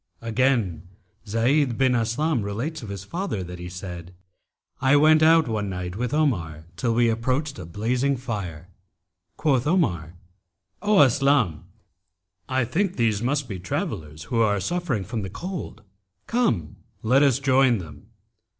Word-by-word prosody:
Again 115 - 0 0.4
Zayd 120 +4 +2
bin 130 -1 +3
Aslam 120 +4 0
relates 115 +11 -4
of 110 - -8
his 100 -1 -6
father 170 - -3
that 90 0 -8
he 90 0 -6
said, 90 -1 -8 0.7
'I 135 +2 +4
went 155 +2 +6
out 160 0 +5
one 105 -3 -2
night 90 -1 -5
with 125 +2 -2
Omar 85 - 0
till 115 +5 0
we 120 0 +4
approached 130 +4 -1
a 85 - -8
blazing 125 +9 0
fire. 100 - -5 0.7
Quoth 135 -3 +1
Omar, 90 - 0 0.7
'O 210 -3 +4
Aslam, 135 - +3 0.8
I 130 -1 +1
think 185 - -1
these 110 -4 +1
must 140 +2 0
be 100 -5 -5
travellers 80 -3 -4
who 115 +8 0
are 105 -2 +2
suffering 140 - -1
from 110 +4 -4
the 95 - -5
cold. 175 - -6 0.4
Come, 115 - 0 0.3
let 125 +5 +4
us 140 -4 +4
join 135 -3 +3
them.' 80 -6 -10
115 Hz, 145 wpm, -24 LUFS, 95-140 Hz, 0.8 s, went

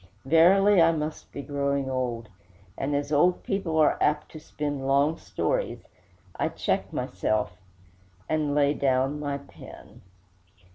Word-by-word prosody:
Verily, 180 +6 +5
I 165 0 +6
must 155 0 -5
be 140 - -7
growing 140 0 -1
old; 125 -3 -3 0.5
and 140 +2 -2
as 145 +1 -2
old 175 +5 +3
people 190 -5 -2
are 155 -1 +3
apt 150 0 +1
to 155 - -9
spin 150 -2 -4
long 140 +3 +3
stories, - - -2 0.5
I - - -1
check - - -2
myself, 105 -4 -2 0.7
and 150 -2 0
lay 145 0 +3
down 135 +1 0
my 145 -1 -2
pen. 140 - -14
145 Hz, 135 wpm, -26 LUFS, 140-155 Hz, 0.7 s, I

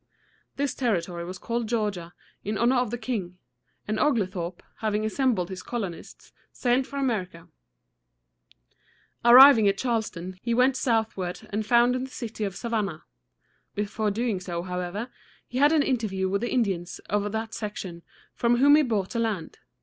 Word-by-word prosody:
This 280 -1 -1
territory 175 -8 -1
was 185 +1 -6
called 235 +2 -3
Georgia, 205 -7 -2 0.3
in 210 +1 -2
honor 245 +4 +3
of 245 -2 +1
the 240 - -3
king; 215 -7 -4 0.5
and 215 +1 -1
Oglethorpe, 185 - -1
having 215 -1 -1
assembled 220 -6 0
his 185 -1 -6
colonists, 200 -8 -6 0.2
sailed 255 +1 +1
for 280 - -7
America. 185 -10 -2 1.7
Arriving 240 -2 +9
at 195 0 +2
Charleston, 195 -7 -3
he 235 -1 -1
went 255 +2 +4
southward 220 -8 -1
and 210 +1 -2
founded 245 +3 +3
the - - -17
city 225 -4 -6
of 195 -2 -3
Sa 235 - -5
van´nah. 200 -8 -2 0.7
Before 210 +1 -1
doing 220 -1 -1
so, 175 -2 -4
however, 180 +5 -4 0.4
he 250 - -3
had 290 +2 +6
an 310 -3 +4
interview 215 -8 -1
with 200 +2 -1
the 240 - -2
Indians 190 -8 -1
of 205 0 -1
that 220 +1 -4
section, 190 -5 -6 0.3
from 240 0 +2
whom 285 +3 +7
he - - +5
bought 215 -9 -1
the 235 - -2
land. 215 -8 -3
220 Hz, 155 wpm, -26 LUFS, 185-240 Hz, 1.7 s, Arriving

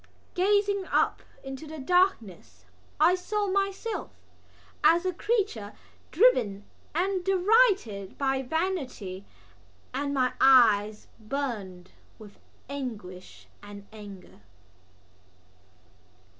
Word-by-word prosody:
Gazing 400 +1 +1
up - - +1 0.2
into 270 +3 -8
the 315 +1 -8
darkness 240 - 0 0.3
I 325 +4 +5
saw 410 +3 -2
myself 395 +3 -2 0.7
as 340 +3 +4
a 370 - 0
creature 380 - -2 0.4
driven 235 - +2 0.3
and 370 +2 0
derided 385 - +2
by 270 -1 0
vanity; 255 - -3 0.7
and 280 +2 -2
my 255 -2 +1
eyes 215 -5 +5
burned 215 -7 -5 0.3
with 210 -2 -15 0.3
anguish 220 -10 -8 0.2
and 205 0 -11
anger. 200 - -12
270 Hz, 90 wpm, -27 LUFS, -, 0.7 s, I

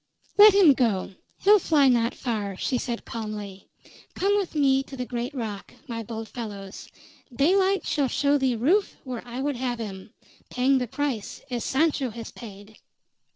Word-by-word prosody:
"Let 415 -1 +8
him 365 -8 +7
go; 225 -8 0 0.3
he'll 415 +1 +6
fly 295 -6 +3
not 235 -2 +2
far," 210 -6 -3
she 250 +3 -1
said 240 -2 -4
calmly. 210 -3 -7 0.5
"Come 400 +2 +2
with 395 -5 -2
me 270 -2 +3
to 270 0 -10
the 250 - -3
great 245 +1 -4
rock, 215 -5 -6
my 230 -2 -4
bold 225 0 -6
fellows; 205 -5 -8 0.4
daylight 375 +9 +2
shall 285 -3 +1
show 285 +2 +1
thee 260 -2 +1
Rufe 335 - +1
where 250 -3 -5
I 245 +2 -5
would 285 -3 -1
have 245 -1 -2
him 200 -3 -7 0.4
paying 260 +2 +2
the 250 - -2
price, 265 -4 -4
as 240 -2 -2
Sancho 285 -2 +1
has 230 0 -8
paid!" 210 -2 -12
250 Hz, 165 wpm, -25 LUFS, 225-285 Hz, 0.5 s, Let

